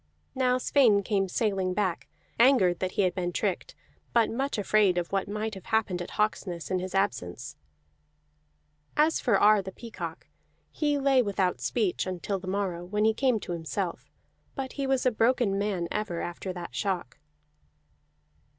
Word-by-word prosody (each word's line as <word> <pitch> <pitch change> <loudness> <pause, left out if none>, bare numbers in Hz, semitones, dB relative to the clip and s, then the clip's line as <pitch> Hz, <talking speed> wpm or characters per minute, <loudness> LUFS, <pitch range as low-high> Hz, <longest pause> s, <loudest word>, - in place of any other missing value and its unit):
Now 255 -1 +2
Sweyn 240 -6 +4
came 195 -2 0
sailing 190 -3 0
back, 185 -4 -1 0.3
angered 220 -9 +5
that 185 0 -2
he 205 - +2
had 185 - +1
been 175 -2 -2
tricked, 190 +1 -2 0.4
but 230 -2 +3
much 270 +3 -2
afraid 205 -2 +3
of 175 -1 -2
what 195 0 0
might 215 +2 -3
have 190 -3 -9
happened 220 -6 0
at 175 - -6
Hawksness 190 -6 -1
in 185 - +1
his 185 +1 -5
absence. 140 - -2 1.4
As 310 +2 +3
for 230 -6 +2
Ar 210 0 +6
the 190 0 -7
Peacock, 185 -8 -7 0.5
he 295 -2 0
lay 270 -2 +4
without 195 -4 0
speech 205 -6 0
until 185 +2 -3
the 185 - -10
morrow, 185 -3 -2
when 210 +4 0
he 220 - +4
came 250 -1 +1
to - - -6
himself; 170 +2 -4 0.5
but 265 -1 -4
he 275 -1 -2
was 265 -1 +1
a 255 - +4
broken 225 -3 +2
man 195 -4 -1
ever 210 -5 -2
after 175 +2 -4
that 175 -1 -7
shock. 185 - -3
200 Hz, 165 wpm, -28 LUFS, 180-225 Hz, 1.4 s, Ar